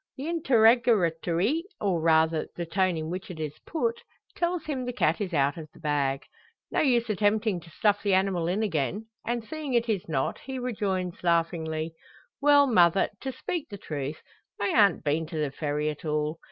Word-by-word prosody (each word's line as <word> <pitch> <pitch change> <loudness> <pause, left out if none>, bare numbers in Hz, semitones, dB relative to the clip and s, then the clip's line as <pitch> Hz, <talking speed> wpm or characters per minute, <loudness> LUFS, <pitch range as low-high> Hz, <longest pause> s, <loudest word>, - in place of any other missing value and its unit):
The 275 +3 -5
interrogatory, 230 - +3 0.2
or 185 -5 0
rather 160 0 +3
the 170 - -3
tone 185 +1 +1
in 160 +1 -4
which 185 +2 -5
it 175 -3 -8
is 155 -1 -5
put, 460 +8 -1 0.3
tells 345 -2 -1
him 275 -4 -3
the 245 - -3
cat 235 - +1
is 190 -3 -2
out 145 -2 +1
of 155 -2 -8
the - - -15
bag. 140 -3 0 0.5
No - - +1
use 245 -5 +2
attempting 210 -1 +1
to 170 - -15
stuff 205 +4 +1
the 200 -2 +2
animal 190 -3 +1
in 195 +5 0
again; 195 +3 -1 0.2
and 240 -1 -1
seeing 295 +1 -4
it 235 0 +2
is 200 -7 -2
not, 135 -4 -1
he 265 -1 -6
rejoins, 200 -8 -2
laughingly 165 -2 0 0.5
"Well, 285 0 +6
mother, 190 -7 +4
to 265 - -4
speak 325 +3 -4
the 200 - -7
truth, 150 -4 -5 0.4
I 200 - 0
ha'nt 200 -8 +4
been 155 +2 0
to 160 0 -6
the 150 -3 -1
Ferry 150 +1 -2
at 150 - -11
all. 150 +1 -1
185 Hz, 185 wpm, -27 LUFS, 160-235 Hz, 0.5 s, Well